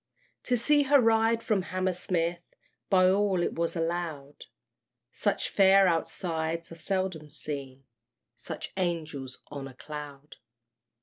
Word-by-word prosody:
To 245 - +2
see 290 +5 +4
her 285 -1 +7
ride 225 0 +3
from 210 -4 +1
Hammersmith, 180 -2 -1 0.5
By 185 -2 +5
all 190 -1 +2
it - - -1
was 170 +1 -1
allowed, 165 -4 -3 0.7
Such 205 - 0
fair 195 -1 +6
outsides 165 -1 -2
are - - -8
seldom 185 -3 -2
seen, 135 -3 -6 0.5
Such - - -7
Angels 155 -8 -3
on 140 -2 -6
a 130 - -12
Cloud. 150 0 -9
170 Hz, 120 wpm, -28 LUFS, 150-195 Hz, 0.7 s, her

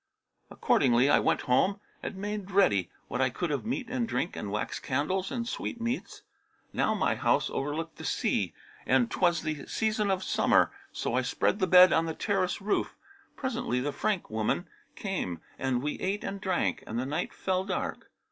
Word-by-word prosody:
Accordingly 125 +2 +3
I - - +6
went - - +2
home 190 +11 +2 0.2
and - - -5
made 205 0 -4
ready 105 - +3 0.2
what 125 - -2
I 130 - +3
could 165 +6 -3
of 145 +9 -2
meat 250 +1 -2
and 250 -1 -1
drink - - -1
and 105 - -4
wax 105 0 -2
candles 180 +9 -1
and 235 -2 -2
sweetmeats. 235 +1 -4 0.5
Now - - +1
my - - +2
house - - +1
overlooked 155 +4 -3
the - - -9
sea - - 0 0.4
and 240 - +3
'twas 175 -3 +2
the 155 -3 -4
season 215 -2 0
of 190 -1 0
summer; - - +3 0.2
so - - -3
I - - +3
spread - - 0
the 185 - +2
bed 180 +1 +8
on 165 0 +2
the 160 - -3
terrace 195 -3 0
roof. 205 +1 0 0.4
Presently, 245 - -1
the 145 +3 -2
Frank 205 - -1
woman 110 - 0 0.3
came 170 - -3 0.2
and 130 -1 0
we 150 - -2
ate 195 +2 -1
and 195 0 -4
drank, 190 - 0
and 115 - -4
the 125 - -1
night 150 +6 -2
fell 185 -1 -1
dark. 190 -1 -3
185 Hz, 180 wpm, -29 LUFS, 140-205 Hz, 0.5 s, bed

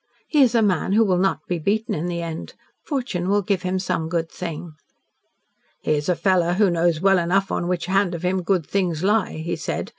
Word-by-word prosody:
He 300 - +3
is 245 -3 +4
a 230 - +4
man 190 -1 +1
who 225 +2 +5
will 185 -3 +2
not 195 +1 0
be 175 -1 -2
beaten 215 +7 0
in 160 +3 -2
the 170 -1 -3
end. 165 -1 -6 0.3
Fortune 240 - -2
will 205 0 +2
give 190 -1 0
him 185 +1 -1
some 165 -3 -2
good 165 -1 -2
thing." 170 -1 -6 1.1
"He - - -1
is 150 +3 -1
a 180 - +3
fellow 180 -2 +2
who 195 0 +3
knows 170 -1 +1
well 195 -1 +4
enough 190 +3 +1
on 175 - -1
which 180 -1 -1
hand 190 -1 +1
of 170 - -7
him 185 +1 +1
good 180 -2 0
things 180 -3 -1
lie," 210 0 +2
he 160 +2 -3
said. - - -4
180 Hz, 220 wpm, -22 LUFS, 170-195 Hz, 1.1 s, who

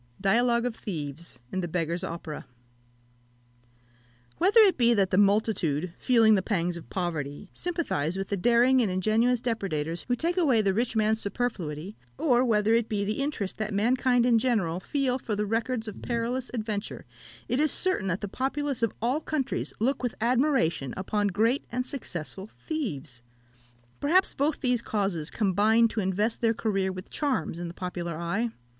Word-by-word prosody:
Dialogue 235 +4 +2
of 245 -2 -2
Thieves 160 -5 -5
in 190 - -1
the 175 - -2
Beggar's 170 +1 -2
Opera. 165 -4 -6 1.9
Whether 405 +6 +6
it 390 -5 +5
be 240 -1 +4
that 195 -3 +2
the 185 - +2
multitude, 195 -6 +1
feeling 230 -4 +5
the 195 - +3
pangs 180 -3 -1
of 170 - -10
poverty, 165 -1 -4
sympathise 290 - -1
with 195 0 -4
the 200 - 0
daring 240 +6 +4
and 220 - +1
ingenious 220 +6 +2
depredators 175 -9 -2
who 245 - +2
take 340 +7 -1
away 280 -10 +4
the 195 -1 +2
rich 235 +3 -1
man's 220 0 +2
superfluity, 195 -5 -3 0.2
or 250 -4 +3
whether 220 -2 +2
it 230 -1 +2
be 205 -2 -1
the 215 +6 -2
interest 270 -9 -3
that 215 -1 -2
mankind 245 +3 +2
in 235 -2 +4
general 210 -9 0
feel 265 +4 -1
for 220 -4 -3
the 210 +1 -1
records 225 +2 -1
of 210 - -7
perilous 240 +2 -2
adventure, 215 -3 -4 0.4
it 250 - 0
is 305 0 +3
certain 370 - +2
that 185 0 -1
the 205 - -3
populace 270 +4 -2
of 230 -3 0
all 255 +6 +1
countries 290 -4 -2
look 260 +6 0
with 245 -2 -2
admiration 235 - +1
upon 205 +2 0
great 225 +7 +1
and 250 +1 -1
successful 190 - -6
thieves. 155 - -5 0.8
Perhaps 350 +7 +3
both 290 +2 0
these 250 -3 +1
causes 195 -8 -1
combine 215 +3 +3
to 220 - -3
invest 205 +3 0
their 230 -1 +2
career 195 -4 0
with 185 0 -9
charms 275 - -1
in 175 - -4
the 170 - -7
popular 175 -3 -4
eye. 195 +8 -1
220 Hz, 170 wpm, -27 LUFS, 185-250 Hz, 1.9 s, Whether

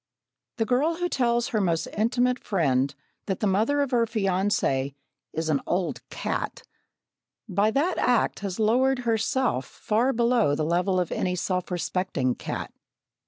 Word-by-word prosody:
The 225 - +1
girl 280 +8 +2
who 355 +1 -1
tells 240 -6 +1
her 215 -3 0
most 165 -4 +1
intimate 245 +3 +1
friend 140 -8 +1 0.4
that 195 - -1
the - - 0
mother 220 +9 +2
of 280 -2 -1
her 235 -2 +3
fiancé 190 - 0 0.4
"is 160 0 -3
an 150 -3 +1
old 180 0 -1
cat," - - -3 0.8
by 205 +1 +2
that 295 +10 +1
act 245 -2 +2
has 195 0 -4
lowered 250 +4 +3
herself 225 - +1
far 235 +4 0
below 235 - +2
the 155 - -1
level 180 +3 +1
of 180 - -1
any 180 -1 -1
self 180 0 -2
respecting 175 -7 -1
cat. - - -5
210 Hz, 150 wpm, -26 LUFS, 180-245 Hz, 0.8 s, her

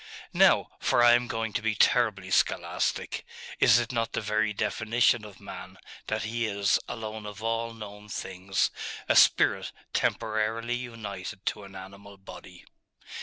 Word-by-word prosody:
'Now - - +5
for 120 - +3
I 120 0 +8
am 120 0 +2
going 115 -3 -3
to - - -1
be 110 -1 0
terribly 105 -5 +2
scholastic - - 0 0.4
is - - +6
it 120 0 -1
not 115 -2 -1
the - - 0
very 110 0 0
definition 115 +2 +1
of 105 -2 -12
man, - - -9 0.3
that 110 0 -1
he 115 +1 -1
is, 100 -1 +2
alone 110 -1 -6
of 105 +1 -9
all 115 0 -1
known 105 -1 -10
things, 95 0 -1 0.4
a - - +3
spirit - - +4 0.2
temporarily 110 +2 0
united 105 -5 -7
to 105 - -2
an 95 0 -13
animal 100 +1 -11
body? 90 -2 -12
110 Hz, 150 wpm, -28 LUFS, 100-115 Hz, 0.4 s, I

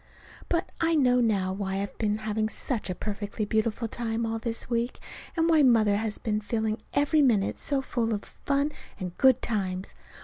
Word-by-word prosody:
But 340 0 0
I 330 0 +3
know 250 -4 +4
now 195 -5 +1
why 190 -1 -3
I've 200 0 -4
been 210 -1 +1
having 215 0 0
such 225 -3 -2
a 185 - -2
perfectly 210 +1 -3
beautiful 220 +2 0
time 230 0 -2
all 225 0 -2
this 230 0 -2
week, 235 +1 -1 0.4
and 325 0 +3
why 320 -2 +5
Mother 220 -6 +5
has 215 0 -2
been 215 -1 -1
filling 220 0 -1
every 290 +2 +4
minute 220 -8 +2
so 275 -2 0
full 230 -3 -1
of 205 -2 -2
fun 280 +1 -1 0.3
and 180 -2 -5
good 260 -1 +5
times. 190 -4 -2
225 Hz, 180 wpm, -27 LUFS, 210-250 Hz, 0.4 s, why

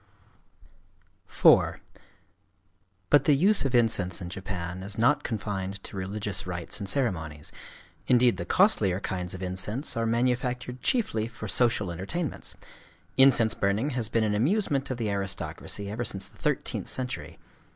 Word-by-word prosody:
IV - - +5 1.4
But 145 -1 +6
the 145 - +5
use 190 +1 +3
of 130 -2 0
incense 105 -7 +2
in 90 -2 -6
Japan 95 -2 -5
is 100 +1 -5
not 140 +6 +3
confined 100 -4 -3
to - - -9
religious 100 0 -3
rites 85 +1 -4
and 100 -2 -4
ceremonies: 80 - -2 0.6
indeed 125 -1 +4
the - - -3
costlier 100 - +3
kinds 90 -2 -4
of 95 - -7
incense 100 +9 -1
are 115 0 0
manufactured 125 +1 -1
chiefly 115 - 0
for 115 -2 -8
social 105 -2 +2
entertainments. 115 - -4 0.6
Incense 125 -5 +5
burning 105 +9 0
has 120 -4 -1
been 115 -1 +1
an 105 -1 +1
amusement 140 - +1
of 130 - -2
the 110 -4 -1
aristocracy 100 +1 -3
ever 115 +3 -2
since 95 -4 -2
the - - -21
thirteenth - - -1
century. 125 -1 -5
110 Hz, 140 wpm, -27 LUFS, 95-125 Hz, 1.4 s, But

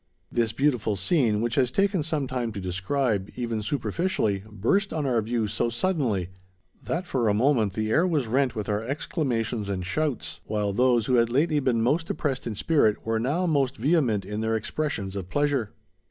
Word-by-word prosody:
This 115 -2 +1
beautiful 125 -7 +1
scene, 110 - +2
which 120 0 -1
has 130 -2 +2
taken 195 +3 +2
some 150 -2 -1
time 125 -3 -2
to 100 - -5
describe, 95 +3 -1
even 115 -3 -2
superficially, 120 - -1
burst 195 - +1
on 155 -3 -2
our 120 -4 +2
view 115 0 -1
so 120 +3 0
suddenly, 120 - 0 0.5
that 175 +3 -2
for 125 -9 0
a 105 - +2
moment 115 -4 +2
the 110 +1 -1
air 170 +9 +4
was 155 -7 +1
rent 130 +3 +1
with 105 -2 -3
our 105 +1 -1
exclamations 120 - -2
and 95 -2 -2
shouts, 150 +6 -2
while 105 -2 -1
those 120 0 +3
who 125 0 +3
had 115 -1 +3
lately 150 +5 +2
been 125 -5 +1
most 155 +7 +1
depressed 135 -6 -2
in 110 - -3
spirit 110 -4 +2
were 115 0 0
now 145 +10 0
most 140 -6 +1
vehement 130 - +2
in 105 +2 -4
their 110 0 0
expressions 110 -3 -3
of 95 -2 -5
pleasure. 145 -5 +1
120 Hz, 185 wpm, -26 LUFS, 110-145 Hz, 0.5 s, air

